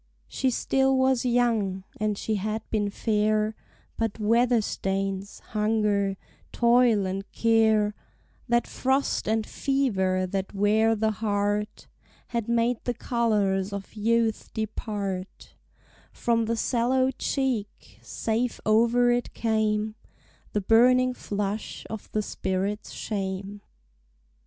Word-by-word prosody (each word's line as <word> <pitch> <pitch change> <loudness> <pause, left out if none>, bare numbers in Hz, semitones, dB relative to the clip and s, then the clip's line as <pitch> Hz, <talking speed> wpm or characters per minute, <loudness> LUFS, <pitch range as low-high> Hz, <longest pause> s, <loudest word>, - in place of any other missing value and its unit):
She 265 - 0
still 265 +2 +2
was 260 -1 +2
young, 225 -6 +1
and 210 -1 -1
she 220 - -2
had 215 +2 -3
been 205 -2 +1
fair; 215 +1 +1 0.5
But 225 -2 -1
weather 235 +3 +3
stains, 195 -1 -3
hunger, 210 -2 +1 0.3
toil, 235 -4 +4
and 195 +1 -4
care, 220 -2 +3 0.6
That 240 0 +3
frost 265 -2 0
and 220 0 +1
fever 190 -10 0
that 190 +2 -4
wear 215 +3 +3
the 220 0 +1
heart, 205 0 -1 0.4
Had 235 -1 -2
made 235 0 +1
the 245 - -2
colors 210 -5 0
of 200 -1 -6
youth 225 +1 0
depart 205 -3 -4 0.6
From 230 -1 0
the 230 +1 -1
sallow 255 +3 +1
cheek, 250 -5 -3
save 230 +2 -2
over 235 +3 +4
it 240 0 -1
came 215 -1 0 0.6
The 210 - +1
burning 250 +5 +4
flush 205 -2 -4
of 220 -2 -7
the 215 - 0
spirit's 200 +2 -3
shame. 195 0 -4
220 Hz, 115 wpm, -26 LUFS, 205-235 Hz, 0.6 s, toil